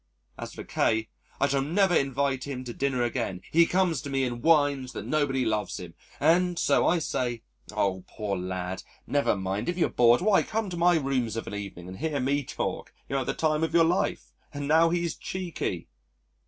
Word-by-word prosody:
As - - -7
for - - -7
K, 110 0 0 0.3
I - - +4
shall 140 -1 +1
never 175 +6 +2
invite 135 -2 +1
him 135 -3 -5
to 120 -2 -6
dinner 135 -2 0
again. 115 -7 -2
He 165 +1 +5
comes 180 -6 +1
to 145 - -6
me 135 -1 0
and 120 -2 -3
whines 145 -4 +3
that - - -6
nobody 140 -4 +1
loves 110 -2 -1
him, 90 -2 -9 0.3
and 175 +3 +3
so - - +3
I 175 - +3
say, 125 -7 -2 0.3
'Oh! 95 -2 0
poor 105 -2 -3
lad, 90 +1 -4 0.2
never 145 -5 +1
mind, 95 - -2
if 175 - -2
you're 175 - +2
bored, 120 0 +5
why, 200 +1 +4
come 220 -3 -3
to - - -3
my 175 +1 +4
rooms 130 -6 -1
of 115 - -3
an - - -7
evening 100 -4 -6
and 95 +1 -9
hear 155 -3 -1
me 140 +2 +1
talk - - -4 0.2
you'll 135 - -1
have 130 - -4
the - - -1
time 155 0 +1
of 160 0 -1
your 165 -1 +6
life.' 175 +3 -1 0.2
And 145 -1 -5
now 165 +2 +5
he's 170 -1 0
cheeky." 175 - -4
140 Hz, 205 wpm, -27 LUFS, 115-165 Hz, 0.3 s, your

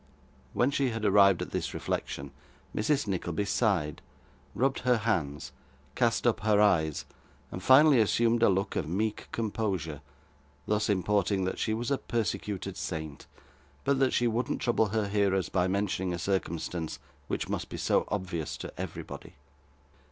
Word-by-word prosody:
When 125 +3 +2
she 140 -2 +1
had 115 -2 -3
arrived 100 -2 +5
at - - -9
this - - -3
reflection, 70 0 -3 0.4
Mrs. 140 +5 +1
Nickleby 95 -1 -2
sighed, 95 -8 0 0.5
rubbed 135 +1 +1
her 125 -1 +3
hands, 85 -11 -1 0.4
cast 115 - +1
up 115 -3 +3
her 105 0 +3
eyes, 80 -8 +2 0.5
and - - -6
finally 140 0 +7
assumed 115 +2 +2
a - - +6
look 95 +2 0
of 80 - -2
meek 105 +5 -2
composure; 95 -9 -2 0.6
thus 105 0 0
importing 100 0 +1
that 95 - -2
she 110 - 0
was 120 +4 -3
a 140 - +1
persecuted 100 -4 -3
saint, 80 -4 -5 0.6
but 140 -1 +2
that 135 -1 +3
she 120 - +1
wouldn't 120 +1 0
trouble 115 -2 +2
her 105 0 -1
hearers 100 -2 +1
by 90 -1 +1
mentioning 95 -1 -1
a - - -5
circumstance 85 -3 -2 0.3
which - - -2
must - - -3
be - - -6
so - - +2
obvious 90 -6 -3
to - - -7
everybody. - - -7
100 Hz, 150 wpm, -29 LUFS, 90-115 Hz, 0.6 s, finally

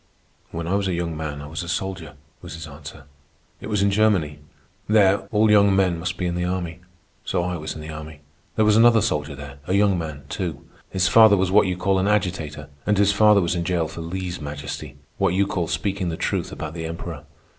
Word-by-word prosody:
"When 85 0 -5
I 90 - -1
was 100 0 +1
a 90 - 0
young 85 -1 -3
man 75 -2 -5
I - - -7
was 80 +3 -5
a 85 - -6
soldier," 95 -2 -4 0.3
was - - -8
his 80 -1 -8
answer. 75 0 -11 0.6
"It - - -8
was 105 -2 +1
in 100 - +3
Germany. 100 -8 +2 0.5
There 100 -2 +5
all 110 0 +3
young 100 -2 +5
men 90 -3 +2
must 90 0 -3
be 90 - -2
in 85 - -1
the 90 0 -2
army. 90 -1 -3 0.4
So 85 - -1
I 90 0 -2
was 75 0 -5
in 80 - -7
the 80 +1 -7
army. 75 -1 -9 0.3
There 110 - +3
was 105 0 +4
another 115 0 +6
soldier 75 -9 -1
there, 70 0 -10
a 95 - +1
young 100 -2 +3
man, 75 -3 -6
too. 85 -4 -4 0.2
His 95 -1 +1
father 110 -1 +7
was 95 0 +1
what 100 0 +5
you 90 -1 -2
call 95 +1 +1
an 95 - +1
agitator, 90 -8 -1 0.2
and 105 -1 +3
his 100 0 +4
father 105 0 +5
was 85 -1 0
in 85 -1 -1
jail 85 -2 0
for 80 +1 -8
lese 90 +1 -5
majesty—what 75 +4 -4
you 100 +1 +3
call 90 -4 -2
speaking 95 +3 -2
the 80 - -4
truth - - -2
about 80 0 -6
the 80 -1 -5
Emperor. 80 -2 -7
90 Hz, 225 wpm, -23 LUFS, 80-100 Hz, 0.6 s, father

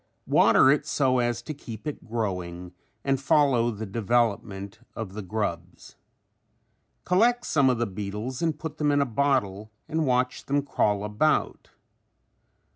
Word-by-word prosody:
Water 130 - +5
it 150 0 0
so 130 -4 +2
as 120 0 -1
to 155 - -5
keep 115 -5 -10
it 150 - -5
growing 90 -6 -4 0.3
and 135 -1 0
follow 135 -4 +3
the 110 -1 -5
development 105 -2 -1 0.2
of 110 -4 -6
the 105 - -5
grubs. 100 -3 -5 1.1
Collect 240 +7 +3
some 140 -3 +3
of 125 - +1
the 120 - 0
beetles 105 +5 -5
and 160 -3 0
put 155 -1 -7
them 150 -1 +2
in 145 - +3
a 140 - +3
bottle 110 -5 0 0.2
and 160 -1 -1
watch 125 0 0
them 140 +1 +1
crawl 105 -7 0
about. 105 +9 0
120 Hz, 145 wpm, -26 LUFS, 105-140 Hz, 1.1 s, Water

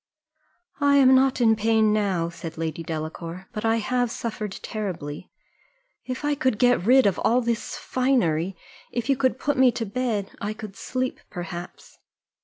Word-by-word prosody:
"I 285 -1 +4
am 265 -2 +7
not 265 0 +4
in 225 -2 +5
pain 220 0 +3
now," 190 -6 0
said 165 -1 -8
Lady 160 0 -3
Delacour, 165 +3 -5
"but 215 - -4
I 225 0 +3
have 245 +2 0
suffered 215 -3 -4
terribly. 180 -7 -5 0.8
If 255 +2 -4
I 295 - +2
could 260 -6 0
get 245 -4 +3
rid 260 +1 +6
of 195 -3 +2
all 240 +2 +3
this 235 -2 -2
finery, 190 - 0 0.3
if 240 0 -3
you 275 - +5
could 260 -1 +1
put 290 +1 -1
me 260 -1 +6
to 230 - -3
bed, 220 -2 -2
I 210 +1 -2
could 215 -2 -9
sleep 255 +4 -3
perhaps." 175 0 -8
220 Hz, 165 wpm, -25 LUFS, 180-255 Hz, 0.8 s, am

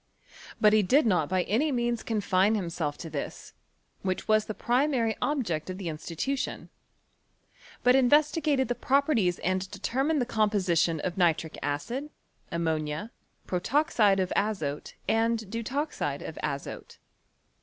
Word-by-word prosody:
But 210 0 +5
he 215 - +6
did 255 +10 +3
not 180 -8 +2
by 185 -1 +1
any 265 - +1
means 240 -2 0
confine 205 -1 +2
himself 170 -6 -2
to 165 - -7
this, - - -6 0.5
which 185 -1 -2
was 215 0 +3
the 215 - -5
primary 245 -3 +1
object 205 - -1
of 185 - -4
the 185 -4 -4
institution; 170 - -3 1.1
but 250 +1 +6
investigated 290 +1 +3
tlie 245 - -3
properties 265 - +2
and 185 +1 0
determined 265 +10 0
the 245 - +1
composition 195 -8 +1
of 185 0 -3
nitric 165 -2 +2
acid, 235 - -3 0.4
ammonia, 160 +4 -2 0.3
protoxide 210 - +2
of 185 -1 0
azote 160 -9 -2
and 225 -2 +1
deut 230 +1 -4
oxide 295 +3 -2
of - - -7
aiote. - - -5
215 Hz, 135 wpm, -28 LUFS, 180-250 Hz, 1.1 s, he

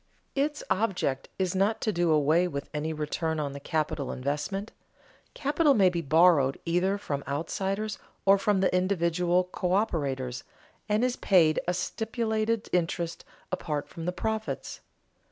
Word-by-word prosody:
_ - - -43 0.3
Its 295 +2 -1
object 185 -9 0
is 185 -1 0
not 200 +3 +1
to 215 - 0
do 175 -1 +1
away 155 +4 +3
with 140 -5 -5
any 150 +1 -2
return 160 +1 -2
on 145 -2 -2
the 140 - -7
capital 145 -2 -2
investment. 150 - -3 0.6
Capital 295 0 +3
may 195 -4 +5
be 170 -1 -1
borrowed 155 -3 +4
either 180 +4 +1
from 140 -8 -4
outsiders 195 +8 -2 0.3
or 195 0 +6
from 200 -1 +2
the 185 - +2
individual 180 -1 +1
coöperators, 145 - -1 0.5
and 210 +3 +2
is 250 -1 -1
paid 165 -5 +4
a 180 - +2
stipulated 220 +2 -1
interest 170 -1 -1 0.3
apart 150 -3 -2
from 165 - -8
the 180 - 0
profits. 220 +3 -3
180 Hz, 145 wpm, -28 LUFS, 155-205 Hz, 0.6 s, or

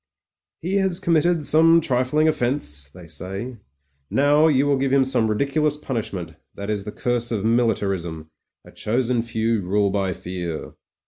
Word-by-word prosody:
"He 190 +4 0
has 190 -3 +1
committed 165 -1 +2
some 165 +3 +6
trifling 140 +1 +1
offence," 120 - -1
they 90 +4 -13
say; 95 - -6 0.5
"now 145 +3 +4
you 140 -3 +3
will 145 -1 +2
give 135 0 0
him 135 -1 +4
some 125 -4 +2
ridiculous 140 +6 0
punish 115 -7 -4
ment. 90 -4 -7 0.2
That 100 +1 -4
is 100 -2 -3
the 105 - -5
curse 120 +1 -1
of 110 -2 -2
militarism 95 -9 0 0.2
— - - -64
3, - - -15
chosen 120 +2 0
few 115 -1 -1
rule 100 +2 +1
by 95 -2 -1
Fear." 85 -2 -6
120 Hz, 160 wpm, -22 LUFS, 100-145 Hz, 0.5 s, some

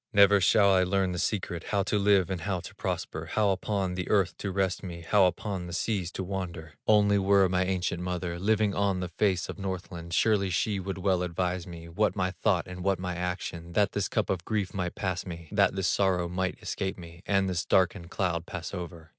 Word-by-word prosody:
Never 100 -1 +6
shall 100 +1 +5
I 95 - +5
learn 95 0 +1
the 90 - -3
secret, 90 -5 -2
How 100 -2 +1
to 105 +2 0
live 100 -2 +3
and 90 -3 -3
how 95 +1 -1
to - - -10
prosper, - - -4
How 105 -2 +3
upon 95 -1 -1
the 90 0 -4
earth 95 -4 +2
to 100 - -3
rest 95 -1 0
me, 85 -3 -7
How 95 +4 +4
upon 90 0 -3
the 85 - -7
seas 90 -1 -1
to 95 - -3
wander! 90 -5 -5
Only 105 -1 +5
were 100 0 +4
my 90 0 +1
ancient 90 -2 -1
mother 90 -1 -3
Living 105 +1 +2
on 100 -2 +1
the 90 -1 -3
face 95 0 +1
of - - -7
Northland, 90 -3 -5
Surely 105 -4 +3
she 100 +3 0
would 95 0 -4
well 95 -1 +1
advise 90 0 -2
me, 85 -1 -9
What 105 +7 0
my 95 -2 0
thought 95 0 0
and 90 0 -7
what 95 -1 +2
my 90 0 -3
action, 90 -1 -4
That 105 0 +3
this 100 -1 -1
cup 110 - 0
of 90 -3 -2
grief 105 -2 -2
might 90 -3 -3
pass 95 -2 -2
me, 85 -3 -8
That 100 -2 +3
this 95 -2 0
sorrow 90 -1 +2
might 95 +1 -2
escape 95 0 -3
me, 85 -1 -11
And 95 -1 +2
this 90 -2 -1
darkened 90 -1 +1
cloud 90 -3 -1
pass 90 0 -6
over." 85 -3 -7
95 Hz, 220 wpm, -28 LUFS, 90-100 Hz, -, Never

